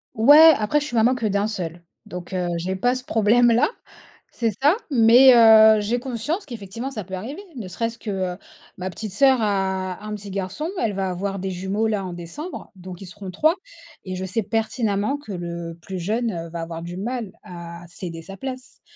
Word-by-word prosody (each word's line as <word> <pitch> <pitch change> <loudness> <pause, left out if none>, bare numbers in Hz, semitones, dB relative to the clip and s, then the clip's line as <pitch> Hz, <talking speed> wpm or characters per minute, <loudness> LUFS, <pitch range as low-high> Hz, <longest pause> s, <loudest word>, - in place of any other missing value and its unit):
Ouais, 295 +8 +8
après, 220 +8 +1
je - - -3
suis 240 - -6
maman 240 +4 +4
que 235 -3 -3
d'un 200 0 +1
seul, 175 -5 -5 0.2
donc 180 -2 -8
heu, 180 -1 -1
j'ai 185 +3 -2
pas 245 +7 +1
ce 255 - -6
problème-là. 230 - +4 0.6
C'est 230 -2 -1
ça, 295 +6 +5 0.2
mais 245 +1 +7
heu, 220 -1 +8
j'ai 235 +4 -1
conscience 265 - -3
qu'effectivement 230 +1 -6
ça 215 -6 -5
peut 190 - -11
arriver, 250 - -6
ne 215 -6 -6
serait-ce 230 +5 -3
que, 215 - -7 0.3
heu, - - -16 0.4
ma 185 +1 -4
petite 195 +3 -7
sœur 260 +3 +4
a 190 -2 -1
un 215 - -5
petit 205 -1 -9
garçon, 200 - -3
elle 220 -3 0
va 190 -1 -2
avoir 195 +2 -3
des 190 +1 -3
jumeaux 190 +4 -1
là 205 -3 -1
en 180 - -5
décembre, 175 - -8
donc 185 -1 -10
ils 195 - -8
seront 190 +1 -8
3. 310 - +3 0.5
Et 185 - -4
je 190 - -4
sais 195 +4 -2
pertinemment 220 +2 -1
que 285 -8 -11
le 170 -1 -6
plus 190 +1 -6
jeune 200 -3 -2
va 170 0 -5
avoir 165 0 -6
du 175 +1 -7
mal 230 -1 -4
à 170 -1 -9
céder 170 -1 -7
sa 195 +4 -10
place. 260 +1 -7
205 Hz, 200 wpm, -23 LUFS, 185-235 Hz, 0.6 s, Ouais